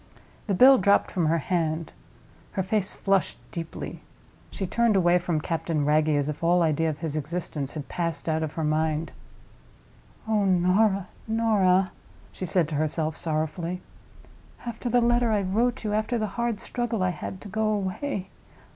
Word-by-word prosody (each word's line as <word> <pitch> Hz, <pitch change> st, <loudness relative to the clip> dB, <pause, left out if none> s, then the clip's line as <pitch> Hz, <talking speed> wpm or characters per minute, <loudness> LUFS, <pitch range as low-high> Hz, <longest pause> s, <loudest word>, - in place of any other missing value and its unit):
The 200 Hz, -, +1 dB
bill 260 Hz, +5 st, +8 dB
dropped 200 Hz, +2 st, +3 dB
from 175 Hz, -5 st, +1 dB
her 165 Hz, +2 st, +3 dB
hand; 165 Hz, -1 st, -1 dB, 0.6 s
her 190 Hz, -, 0 dB
face 200 Hz, 0 st, 0 dB
flushed 195 Hz, -2 st, +1 dB
deeply. 165 Hz, -2 st, -6 dB, 0.5 s
She 195 Hz, -, -4 dB
turned 230 Hz, +3 st, +2 dB
away 175 Hz, -1 st, +4 dB
from 170 Hz, -2 st, -1 dB
Captain 160 Hz, -2 st, -1 dB
Wragge, 155 Hz, +1 st, +3 dB
as 145 Hz, -1 st, 0 dB
if 150 Hz, +2 st, -5 dB
all 175 Hz, +1 st, +4 dB
idea 160 Hz, 0 st, +1 dB
of 150 Hz, -, -4 dB
his 155 Hz, -2 st, -4 dB
existence 155 Hz, -2 st, -3 dB
had 145 Hz, -4 st, -6 dB
passed 170 Hz, 0 st, -3 dB
out 160 Hz, 0 st, +1 dB
of 155 Hz, -2 st, -3 dB
her 160 Hz, -, -3 dB
mind. 155 Hz, +1 st, 0 dB, 1.2 s
"Oh, 215 Hz, -2 st, +2 dB
Norah, 190 Hz, +1 st, +3 dB, 0.2 s
Norah!" 200 Hz, -5 st, +3 dB, 0.4 s
she 185 Hz, -, -5 dB
said 170 Hz, -2 st, +2 dB
to 155 Hz, -, -3 dB
herself, 155 Hz, 0 st, -1 dB
sorrowfully. 165 Hz, +3 st, -2 dB, 0.8 s
"After 235 Hz, +1 st, -4 dB
the 245 Hz, +1 st, +3 dB
letter 240 Hz, 0 st, +3 dB
I 205 Hz, -2 st, +2 dB
wrote 230 Hz, +7 st, 0 dB
you—after 215 Hz, +3 st, 0 dB
the 215 Hz, -, 0 dB
hard 235 Hz, -2 st, -1 dB
struggle 240 Hz, -5 st, -2 dB
I 185 Hz, -, +2 dB
had 175 Hz, +3 st, -6 dB
to -, -, -9 dB
go 220 Hz, +2 st, -1 dB
away! 200 Hz, +1 st, -2 dB
180 Hz, 165 wpm, -26 LUFS, 160-215 Hz, 1.2 s, bill